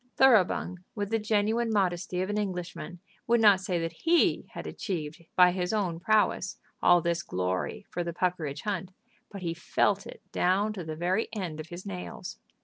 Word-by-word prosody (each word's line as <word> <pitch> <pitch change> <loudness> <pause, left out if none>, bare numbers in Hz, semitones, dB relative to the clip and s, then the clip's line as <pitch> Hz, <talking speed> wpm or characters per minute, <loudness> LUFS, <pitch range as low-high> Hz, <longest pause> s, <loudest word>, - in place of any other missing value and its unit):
Thoroughbung, 200 -7 +4 0.2
with 205 -1 -3
the 225 - +2
genuine 220 +2 +1
modesty 185 -3 0
of 190 - -3
an 210 - -1
Englishman, 180 -3 -4 0.3
would 235 0 +4
not 205 -3 +7
say 190 -2 -1
that 165 0 -2
he 330 - +2
had - - -6
achieved 160 -4 -4
by 180 -1 +7
his 180 0 -1
own 185 -6 0
prowess 210 -1 +2 0.2
all 175 -1 +6
this 170 0 0
glory 90 0 -2
for 175 - -2
the 170 - -3
Puckeridge 165 -5 -2
Hunt, 190 -3 -3 0.4
but 200 -3 -8
he 165 -1 -1
felt 195 +4 +1
it - - -11
down 195 +4 +2
to 190 -4 -5
the 155 -1 -5
very 180 +7 0
end 175 -7 -4
of 155 0 -7
his 175 +1 -8
nails. 90 -2 -6
180 Hz, 180 wpm, -29 LUFS, 170-205 Hz, 0.4 s, not